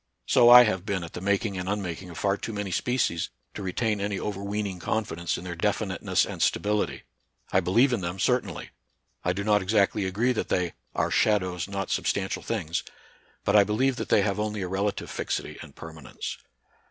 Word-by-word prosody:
So 120 - +6
I 125 0 +11
have 95 -6 0
been 100 -4 -2
at 85 - -9
the - - -6
making 100 0 0
and 90 +1 -3
unmaking 95 -3 -3
of 85 - -9
far 100 -1 +1
too 110 - -6
many 105 -2 -3
species 125 -7 0 0.2
to - - -6
retain 105 +2 -1
any 100 -1 -1
overweening 100 -1 -3
confidence 85 -2 -2
in - - -8
their 90 -1 -5
definiteness 85 - 0
and - - -6
stability. 105 0 0 0.5
I 95 - +5
believe 115 +9 +3
in 115 - 0
them, 85 +1 -3
certainly. 105 -4 -1 0.5
I 90 - +2
do 100 +3 -3
not 105 0 +3
exactly 100 +1 +2
agree 105 +7 +1
that 115 - -3
they 90 -2 0
" - - -41
are - - 0
shadows, 95 -5 +1
not 100 -2 -4
substantial 95 -1 -1
things," 85 -8 -2 0.6
but - - +2
I 105 - +8
believe 125 +6 +1
that - - -4
they 100 - +4
have 100 0 -1
only 105 -2 -2
a - - -3
relative 100 +2 -2
fixity - - -3
and - - -12
permanence. 80 -5 -7
100 Hz, 190 wpm, -27 LUFS, 90-105 Hz, 0.6 s, I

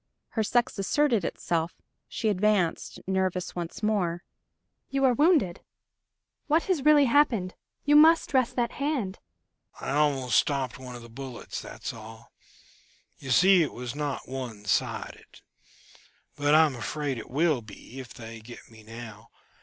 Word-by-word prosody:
Her 225 - -1
sex 235 0 0
asserted 235 - +2
itself; 165 0 -2 0.3
she 225 - -3
advanced, 200 -3 0
nervous 190 -1 -1
once 175 +4 -6
more. 180 -5 0 0.7
"You 275 0 +1
are 255 - +5
wounded? 290 - +3 0.9
What 315 +2 +3
has 355 -8 0
really 300 -1 +6
happened? 230 -8 +2 0.3
You 295 +1 +4
must 320 +2 +6
dress 260 -2 +2
that 240 -2 -1
hand 275 -10 -2 0.3
..." - - -26
"I - - -4
almost 140 -5 +2
stopped 135 -3 -1
one 125 -1 -8
of 120 - -10
the - - -11
bullets 125 +1 -7
that's - - -7
all. 110 0 -12 0.9
You 135 - -8
see 180 +8 +6
it 155 - -1
was 125 -1 -6
not 145 -2 -4
one 125 -6 -6
sided. 105 - -3 0.9
But 145 +1 +3
I 160 +1 +7
am 145 -4 -2
afraid 135 +3 -3
it - - -10
will 150 -1 +1
be, 110 +4 -12
if 130 -2 -9
they 115 -1 -9
get 120 +1 -13
me 110 -1 -15
now. 110 0 -10
165 Hz, 155 wpm, -27 LUFS, -, 0.9 s, I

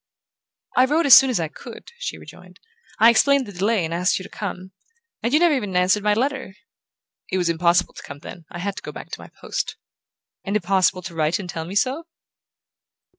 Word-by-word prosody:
"I 255 - +5
wrote 310 +5 +1
as 275 - +8
soon 265 +2 +9
as 245 - 0
I 165 - -1
could," 155 - -12
she - - -4
rejoined. - - -15 0.4
"I 230 +1 +7
explained 280 +3 +3
the 205 - -9
delay 200 0 0
and 160 - -4
asked 180 +2 +1
you 185 - -6
to - - -11
come. 185 -2 -6 0.5
And 235 - -1
you 300 - +4
never 345 -2 +4
even 205 -9 -2
answered 185 +3 +3
my 210 0 +2
letter." 260 -4 -2 0.8
"It 185 - 0
was 175 -2 0
impossible 170 +2 +2
to - - -10
come 145 - -9
then. 170 0 -10
I - - -8
had 195 +3 -3
to - - -6
go - - -7
back - - -10
to - - -7
my - - -11
post." - - -3 0.7
"And 200 +1 -3
impossible 185 -1 +1
to 175 -1 -7
write 155 0 +1
and 195 - -7
tell 165 -2 -5
me 185 +4 -7
so?" 270 +10 0
195 Hz, 215 wpm, -22 LUFS, 180-255 Hz, 0.8 s, soon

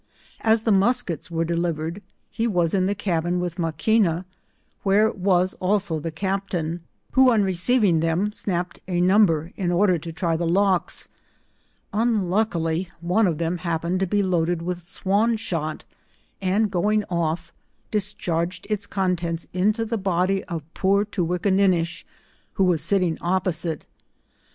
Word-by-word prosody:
As 220 0 +2
the 225 - +2
muskets 195 - +1
were 165 -1 -1
delivered, 170 +1 -2 0.3
he 230 0 -1
was 175 -6 +1
in 185 -1 +2
the 200 - 0
cabin 175 -2 -1
with 175 -1 -4
Maquina, 175 +1 +1 0.6
where 210 +2 +3
was 185 -1 +1
also 190 -3 0
the 165 - -4
cap 195 +4 -2
tain, 165 -1 -2 0.3
who 260 -1 +6
on 220 -3 +3
receiving 190 0 +2
them, 165 +6 0
snapped 180 -4 -3
a 180 -2 -1
number 180 -4 +3
in 180 -3 -1
order 180 -1 +3
to 165 +2 -7
try 165 0 -1
the 170 +1 -1
lochs; 190 +1 +1 0.9
unluckily 190 -6 0 0.2
on3 190 +5 +3
of 160 - -2
them 170 +2 -1
happened 170 +1 -1
to 190 - 0
be 205 +2 +1
loaded 175 -2 0
with 180 0 -3
swan 200 +6 0
shot, 160 -7 -3 0.6
and 195 +3 +1
going 210 +3 +1
off, 170 0 -2 0.4
discharged 185 -4 -1
its 205 -1 -1
contents 175 -3 -1
into 210 +5 +1
the 225 0 -2
body 190 0 +1
of 165 -4 -5
poor 200 +2 +2
Toowinnakinnisb. 180 -2 +1 0.5
who 195 - +1
was 175 -4 +2
sitting 180 0 0
opposite. 175 -3 -1
180 Hz, 140 wpm, -23 LUFS, 170-200 Hz, 0.9 s, who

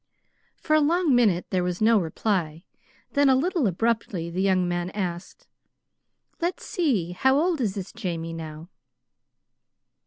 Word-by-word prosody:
For 310 - +1
a - - +5
long 325 0 +2
minute 210 -8 +3
there 185 -2 +1
was 180 0 -2
no 220 0 +4
reply; 170 -2 -2 0.5
then, 285 -1 +3
a 265 - +5
little 315 - +1
abruptly, 195 -3 -1
the 180 +2 -2
young 185 -2 +2
man 175 0 -2
asked: 180 -3 -5 1.0
"Let's 345 +2 -2
see, 240 - 0
how 265 +9 +2
old 335 -2 +1
is 205 -5 -1
this 195 -2 -6
Jamie 165 -2 -4
now?" 160 0 -8
195 Hz, 145 wpm, -25 LUFS, 175-265 Hz, 1.0 s, a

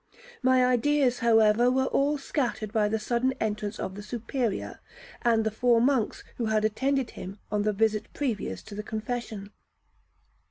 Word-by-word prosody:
My 255 -1 +4
ideas, 255 +1 +2
however, 225 +1 +4
were 265 +1 +2
all 285 +2 +1
scattered 245 -6 -2
by 215 -2 +3
the 220 +1 0
sudden 240 +4 0
entrance 210 -1 -2
of 190 - -4
the 205 - -8
Superior 235 0 -3 0.4
and 230 -2 +3
the 220 - 0
four 235 +2 +3
monks 245 -3 +1
who 230 - -1
had 215 0 +2
attended 265 +4 0
him 190 +2 -8
on 210 -1 +1
the 210 +1 +1
visit 215 +1 0
previous 220 - -3
to 210 - -11
the 210 - -4
confession. 215 -2 -5
225 Hz, 160 wpm, -27 LUFS, 210-250 Hz, 0.4 s, My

